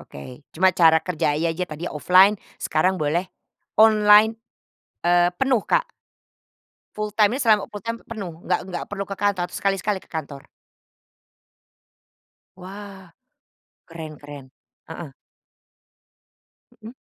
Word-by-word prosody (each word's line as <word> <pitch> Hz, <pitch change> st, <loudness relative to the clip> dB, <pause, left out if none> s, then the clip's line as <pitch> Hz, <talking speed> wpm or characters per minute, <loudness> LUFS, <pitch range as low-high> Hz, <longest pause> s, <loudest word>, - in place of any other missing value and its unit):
oke. 125 Hz, -, -12 dB
Cuman 185 Hz, +2 st, +3 dB
cara 165 Hz, -2 st, +5 dB
kerja 155 Hz, -4 st, -1 dB
ya 165 Hz, +1 st, 0 dB
aja 180 Hz, +3 st, -3 dB
tadi 155 Hz, +2 st, -7 dB
offline 185 Hz, +6 st, +4 dB, 0.2 s
sekarang 185 Hz, +4 st, 0 dB
boleh 170 Hz, +4 st, -1 dB, 0.5 s
online, 215 Hz, 0 st, +6 dB, 0.7 s
eee, 175 Hz, 0 st, +3 dB
penuh, 255 Hz, +1 st, +1 dB
Kak? -, -, 0 dB, 1.1 s
Full 210 Hz, -1 st, -4 dB
time-nya 215 Hz, +4 st, +3 dB
selama 220 Hz, -6 st, +3 dB
full-time 230 Hz, +3 st, -6 dB
tuh -, -, -40 dB
penuh? 200 Hz, -6 st, -6 dB
Nggak -, -, +1 dB
nggak 180 Hz, -2 st, -5 dB
perlu 200 Hz, -1 st, -4 dB
ke 200 Hz, -, -5 dB
kantor, 195 Hz, -3 st, 0 dB
atau 175 Hz, -, -15 dB
sekali-sekali 195 Hz, 0 st, -1 dB
ke -, -, -23 dB
kantor? 145 Hz, -4 st, -6 dB, 2.2 s
Wah, 195 Hz, +1 st, -10 dB, 0.8 s
keren 160 Hz, -2 st, -8 dB
keren. 145 Hz, -2 st, -11 dB, 0.4 s
Heeh. 160 Hz, -2 st, -8 dB, 1.7 s
Mhm. 225 Hz, -, -9 dB
185 Hz, 120 wpm, -22 LUFS, 160-210 Hz, 2.2 s, online